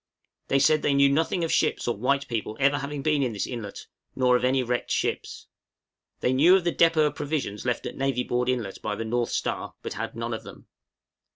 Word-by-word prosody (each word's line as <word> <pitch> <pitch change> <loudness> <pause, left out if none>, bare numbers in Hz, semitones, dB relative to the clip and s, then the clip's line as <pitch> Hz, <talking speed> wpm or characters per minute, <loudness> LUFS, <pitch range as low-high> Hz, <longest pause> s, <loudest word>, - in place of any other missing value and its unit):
They 135 - +2
said 150 +3 +4
they 140 - +1
knew 140 0 +5
nothing 165 +4 +1
of 165 - -1
ships - - +1
or 120 - +1
white 140 +6 0
people 110 -2 -3
ever 140 +1 +3
having 140 0 -5
been 150 -1 +2
within 125 -4 0
this 100 - -2
inlet, 110 -5 -7 0.3
nor 125 -1 +3
of 125 - +1
any 130 +1 +2
wrecked 120 0 -2
ships. - - -2 0.8
They 125 - +2
knew 160 +8 +6
of 190 - +2
the 175 -1 0
depôt 165 -2 +4
of 150 - 0
provisions 140 -10 -3
left 125 - -1
at - - -5
Navy 135 -2 0
Board 125 0 -1
Inlet 120 -7 -2
by 105 - -2
the 115 - -4
'North 120 +1 -1
Star,' - - -3
but - - -4
had 115 +2 -5
none 115 0 -3
of 110 - -4
them. - - -12
130 Hz, 220 wpm, -26 LUFS, 120-145 Hz, 0.8 s, knew